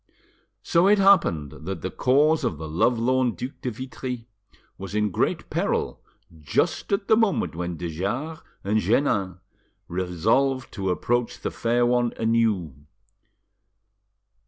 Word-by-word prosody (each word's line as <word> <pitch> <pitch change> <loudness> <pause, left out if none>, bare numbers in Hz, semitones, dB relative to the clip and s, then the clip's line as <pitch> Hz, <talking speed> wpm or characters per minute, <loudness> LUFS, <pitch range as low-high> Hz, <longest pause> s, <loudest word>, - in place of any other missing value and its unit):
So 170 +1 +3
it 210 +1 +5
happened 85 - +3
that 95 -5 -4
the - - -3
cause 150 +4 +3
of 105 -11 -1
the 80 +1 -6
lovelorn 120 +8 +1
Duc 125 - -5
de 125 - -2
Vitry 125 0 -6 0.5
was 95 +1 -6
in 105 -1 +1
great - - -1
peril - - -1 0.4
just 75 - -1
at 200 0 0
the 220 - +6
moment 220 -3 +1
when 85 0 -4
de 85 - -4
Jars 120 - -3 0.2
and 105 +2 +1
Jeannin 100 -4 +1 0.5
resolved 95 +10 0
to 95 -1 -2
approach 120 +6 -1
the - - -3
fair 120 +1 +1
one 120 -1 +1
anew. 110 -8 +1
115 Hz, 135 wpm, -25 LUFS, 90-130 Hz, 0.5 s, the